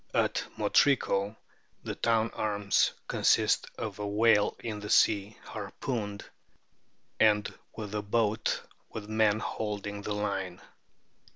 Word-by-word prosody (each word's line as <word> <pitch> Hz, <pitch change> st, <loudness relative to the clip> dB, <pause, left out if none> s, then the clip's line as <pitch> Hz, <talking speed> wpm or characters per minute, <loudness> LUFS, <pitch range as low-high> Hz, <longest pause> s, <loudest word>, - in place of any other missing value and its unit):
At -, -, +1 dB
Motrico 105 Hz, -7 st, +2 dB, 0.5 s
the -, -, -3 dB
town 115 Hz, -1 st, +1 dB
arms 105 Hz, -2 st, +1 dB, 0.2 s
consist -, -, +3 dB
of 105 Hz, -3 st, -5 dB
a 105 Hz, -, -2 dB
whale 105 Hz, 0 st, +3 dB
in 110 Hz, -3 st, -4 dB
the 105 Hz, 0 st, -7 dB
sea, 105 Hz, 0 st, +3 dB
harpooned, 105 Hz, -1 st, -5 dB, 0.9 s
and 105 Hz, -1 st, +3 dB, 0.2 s
with 105 Hz, -2 st, -6 dB
a 105 Hz, -, -1 dB
boat 110 Hz, +1 st, 0 dB, 0.3 s
with 105 Hz, -2 st, -7 dB
men 110 Hz, -1 st, +3 dB
holding 105 Hz, -2 st, -4 dB
the 105 Hz, -, -3 dB
line. 95 Hz, -3 st, -3 dB
105 Hz, 115 wpm, -29 LUFS, 100-110 Hz, 0.9 s, consist